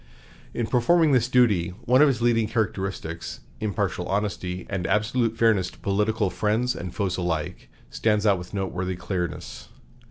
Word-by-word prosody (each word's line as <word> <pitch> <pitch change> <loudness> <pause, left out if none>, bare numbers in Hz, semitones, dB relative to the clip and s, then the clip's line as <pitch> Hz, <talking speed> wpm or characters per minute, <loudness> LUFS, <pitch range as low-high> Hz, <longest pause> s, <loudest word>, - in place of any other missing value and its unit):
In 120 - 0
performing 150 +7 +3
this 125 -3 +3
duty, 105 -9 +2
one 130 +3 +5
of 150 - +7
his 125 -4 0
leading 115 -2 +3
characteristics, 95 -6 -3 0.2
impartial 100 -4 -2
honesty 95 -3 -2
and 95 -3 -3
absolute 115 +3 +1
fairness 110 -6 +3
to - - -17
political 105 0 0
friends 110 +5 0
and 90 0 -6
foes 95 -2 -2
alike, 85 -4 -3 0.2
stands 105 -1 +1
out 100 -3 +4
with 90 - -9
noteworthy 95 -2 -3
clearness. 90 -1 -5
105 Hz, 150 wpm, -25 LUFS, 90-115 Hz, 0.2 s, of